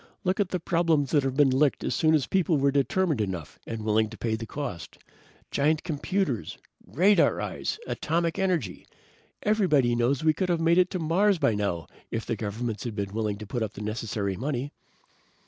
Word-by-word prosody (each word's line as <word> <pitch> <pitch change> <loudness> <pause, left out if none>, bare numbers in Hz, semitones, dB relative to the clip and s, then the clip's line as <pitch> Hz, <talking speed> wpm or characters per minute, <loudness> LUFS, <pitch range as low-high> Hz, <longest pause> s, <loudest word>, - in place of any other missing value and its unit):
"Look 185 +1 0
at 200 -3 +1
the 180 - -2
problems 165 -4 +1
that 145 - +4
have 135 -1 -2
been 140 -2 +4
licked 135 +2 +2
as - - -1
soon 160 -1 +3
as 145 -4 +1
people 180 -4 +1
were 140 0 +3
determined 145 0 +1
enough 90 -6 -5
and 115 -1 -5
willing 110 0 +2
to 115 - -10
pay 115 -2 -2
the 115 0 -6
cost. 100 -14 -6 0.5
Giant 155 +2 +1
computers, 155 - -2 0.3
radar 195 +6 +3
eyes, - - -3
atomic 165 - -1
energy. 170 - -1 0.6
Everybody 175 - +3
knows 125 +4 +1
we 155 -1 +4
could 185 +3 -2
have 170 -2 +2
made 170 +2 +4
it 180 0 +4
to - - -3
Mars 185 +5 +2
by 115 - +2
now 100 -5 -2 0.2
if 115 - -3
governments 110 +1 -3
had 115 -3 -5
been 100 -2 -3
willing 105 -2 -1
to 105 - -8
put 120 +4 -3
up 110 -2 -2
the 100 - -8
necessary 105 -2 -2
money." 135 +4 -3
140 Hz, 190 wpm, -27 LUFS, 110-170 Hz, 0.6 s, that